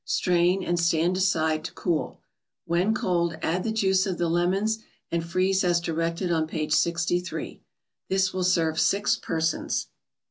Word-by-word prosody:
Strain, 180 +4 +1
and 175 -1 0
stand 170 +1 +2
aside 160 -4 +1
to - - -5
cool. 165 -4 -2 0.4
When 175 +5 +1
cold, 170 -4 0
add 180 +3 0
the 225 - -1
juice 190 -2 +2
of 185 -2 -2
the 170 -1 0
lemons, 190 +6 +1 0.3
and 170 -1 0
freeze 185 +3 +1
as 175 -1 +3
directed 170 +2 -2
on 160 -2 +1
page 155 -1 -2
63. 170 +2 -1 0.5
This 190 0 +1
will 185 0 -1
serve 165 -3 +1
six 205 +4 +2
persons. 160 -7 -2
175 Hz, 150 wpm, -26 LUFS, 165-185 Hz, 0.5 s, as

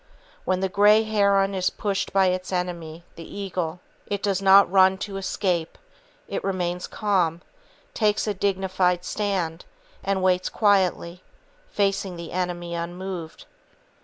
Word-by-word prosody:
When 185 0 0
the 190 - +1
grey 205 +3 +5
heron 200 -2 +2
is 185 -1 +1
pursued 200 -1 -2
by 195 -1 +4
its 185 +1 -3
enemy, 170 -3 -4
the 165 +4 -10
eagle, 180 -4 -4 0.3
it 200 -1 -3
does 195 -2 0
not 195 -1 +6
run 190 0 +5
to 200 0 -5
escape; 180 -3 -2 0.5
it - - -4
remains 180 -2 -2
calm, 180 -5 0 0.5
takes 210 -2 +1
a 210 - -1
dignified 185 -2 0
stand, 185 -5 -2 0.4
and 195 -1 -1
waits 185 0 +2
quietly, 185 -4 +1 0.5
facing 195 - -1
the 170 -1 -8
enemy 175 -1 -3
unmoved. 170 0 -6
185 Hz, 135 wpm, -24 LUFS, 175-200 Hz, 0.5 s, not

